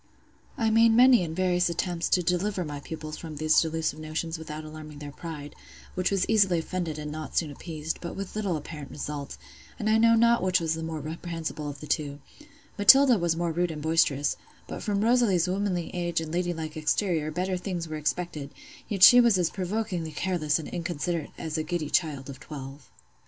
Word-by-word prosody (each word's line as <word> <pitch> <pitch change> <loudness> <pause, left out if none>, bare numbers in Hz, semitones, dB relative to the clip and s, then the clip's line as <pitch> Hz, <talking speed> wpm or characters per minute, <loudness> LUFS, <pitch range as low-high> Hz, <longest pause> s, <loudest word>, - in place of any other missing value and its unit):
I 225 -3 +1
made 230 +1 +6
many 245 -2 +6
and 160 -1 -5
various 180 -1 +2
attempts 170 0 -2
to 180 - +3
deliver 180 +2 0
my 145 -1 -5
pupils 155 +1 -7
from 160 -2 -7
these 155 +1 +4
delusive 160 -1 -2
notions 160 +1 -4
without 155 -1 -7
alarming 155 -1 -9
their 145 0 -8
pride—which 160 +4 -6
was 195 -2 +1
easily 200 -5 +4
offended, 165 -1 -3
and 150 0 -5
not 155 0 -6
soon 155 -3 +1
appeased—but 160 +3 -5
with 195 0 -6
little 200 -6 -1
apparent 150 -1 -8
result; 145 -1 -6 0.4
and 215 - -3
I 220 - +4
know 230 0 +6
not 235 +1 +4
which 185 0 +2
was 165 -1 0
the 160 - -4
more 160 -1 -4
reprehensible 160 -1 -5
of 145 - -9
the - - -7
two: 145 -2 -1 0.6
Matilda 255 +2 +7
was 170 -1 +1
more 170 -1 0
rude 175 +2 0
and 150 -2 -6
boisterous; 155 -3 +2 0.3
but - - -6
from 205 -2 0
Rosalie's 225 -7 +3
womanly 185 -2 -1
age 175 -1 -1
and 160 -1 -5
lady 175 +1 0
like 160 -2 -5
exterior 155 0 0
better 180 +4 -2
things 180 -2 -4
were 155 -1 -5
expected: 150 -1 -3 0.4
yet 195 -3 +1
she 245 +4 +10
was 235 -5 +4
as 175 -2 +1
provokingly 185 -4 -3
careless 155 -4 0
and 160 - -6
inconsiderate 170 -2 -3
as 160 -1 -3
a - - -1
giddy 155 -2 -3
child 145 -6 0
of 135 -2 -9
twelve. 140 -1 -9
165 Hz, 190 wpm, -27 LUFS, 155-185 Hz, 0.6 s, she